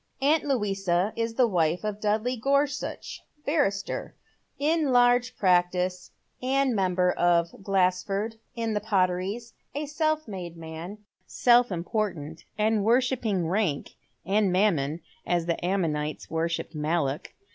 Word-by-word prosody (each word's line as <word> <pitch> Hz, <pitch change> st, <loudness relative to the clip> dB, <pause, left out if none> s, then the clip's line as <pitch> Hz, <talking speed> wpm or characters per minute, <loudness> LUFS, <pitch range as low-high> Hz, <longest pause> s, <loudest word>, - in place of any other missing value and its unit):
Aunt 295 Hz, +3 st, +3 dB
Louisa 195 Hz, -7 st, 0 dB
is 230 Hz, 0 st, -2 dB
the 255 Hz, -, +5 dB
wife 175 Hz, -4 st, +1 dB
of 210 Hz, -1 st, -3 dB
Dudley 215 Hz, +4 st, +1 dB
Gorsuch, 280 Hz, +4 st, -1 dB, 0.2 s
barrister, 205 Hz, -11 st, -1 dB, 0.4 s
in 305 Hz, -1 st, +1 dB
large 245 Hz, 0 st, +4 dB
practice, 180 Hz, -1 st, +1 dB, 0.3 s
and 265 Hz, -1 st, +1 dB
member 180 Hz, -2 st, +2 dB
for 170 Hz, -1 st, +2 dB
Glaseford, 195 Hz, +3 st, 0 dB, 0.2 s
in 230 Hz, -2 st, -1 dB
the 210 Hz, -, +1 dB
Potteries, 200 Hz, +3 st, 0 dB, 0.2 s
a 295 Hz, +1 st, -2 dB
self 310 Hz, +1 st, -1 dB
made 175 Hz, -4 st, -7 dB
man, 165 Hz, +4 st, -7 dB, 0.3 s
self 245 Hz, -2 st, +4 dB
important, 170 Hz, -4 st, -3 dB
and 215 Hz, -1 st, +2 dB
worshipping 230 Hz, -6 st, +1 dB
rank 180 Hz, -6 st, 0 dB, 0.3 s
and 200 Hz, 0 st, +2 dB
mam 190 Hz, -1 st, +3 dB
mon, 145 Hz, +5 st, -3 dB, 0.2 s
as 175 Hz, -1 st, 0 dB
the 170 Hz, 0 st, -2 dB
Ammonites 155 Hz, -5 st, -1 dB
worshipped 165 Hz, +1 st, -2 dB
Moloch. 150 Hz, -2 st, -1 dB
195 Hz, 125 wpm, -27 LUFS, 175-240 Hz, 0.4 s, the